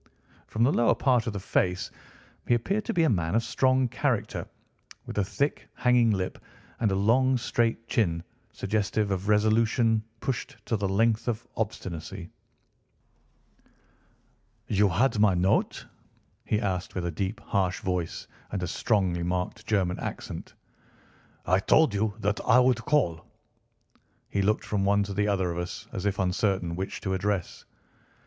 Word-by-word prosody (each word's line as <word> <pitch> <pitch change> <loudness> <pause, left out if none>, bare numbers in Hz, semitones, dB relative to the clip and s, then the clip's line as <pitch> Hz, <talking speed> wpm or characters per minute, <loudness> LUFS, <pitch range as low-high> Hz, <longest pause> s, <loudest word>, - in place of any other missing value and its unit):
From 110 - 0
the 130 - +4
lower 120 - +3
part 125 -4 +2
of 115 - -2
the 100 - -3
face 90 -1 0 0.6
he 120 - +4
appeared 195 - -1
to - - -1
be 170 -7 +2
a 160 - +4
man 85 -2 0
of 115 - +3
strong 130 +1 +2
character, 125 -2 -1 0.6
with - - -7
a - - +3
thick, 140 +9 -2
hanging 125 -2 +4
lip, 95 -3 -1 0.4
and 110 -4 +2
a - - +1
long, 125 +6 +3
straight 115 -1 -1
chin 85 -7 0 0.3
suggestive 105 +1 -1
of 95 +1 -2
resolution 110 +1 +3 0.2
pushed 125 -2 -4
to 115 - 0
the 100 -2 -1
length 110 +3 +2
of 120 -1 -2
obstinacy. 95 -7 -5 2.3
"You 100 0 +3
had 115 +5 +2
my 105 -3 +5
note?" 90 +2 +1 0.6
he 105 - +1
asked 95 -4 -2
with 90 -2 -2
a 85 - -1
deep 95 +7 -3
harsh 95 -3 -1
voice 90 -3 -2 0.3
and 95 -3 -2
a - - -1
strongly 95 -2 0
marked 90 +5 -3
German 95 -4 +1
accent. - - -6 0.9
"I 95 +1 +3
told 140 +5 +4
you 105 +1 0
that 105 +1 0
I 120 - +5
would 125 -2 +3
call." 85 - +1 1.1
He 100 - +1
looked 105 +2 +1
from 100 -2 -1
one 100 +1 +3
to 100 0 -5
the 105 +1 +1
other 95 -3 +1
of 85 - -3
us, 90 0 -5
as 95 +2 -2
if 100 -1 -1
uncertain 95 -2 0
which 95 +2 -4
to 95 -2 -2
address. 95 -1 -2
105 Hz, 155 wpm, -27 LUFS, 95-115 Hz, 2.3 s, my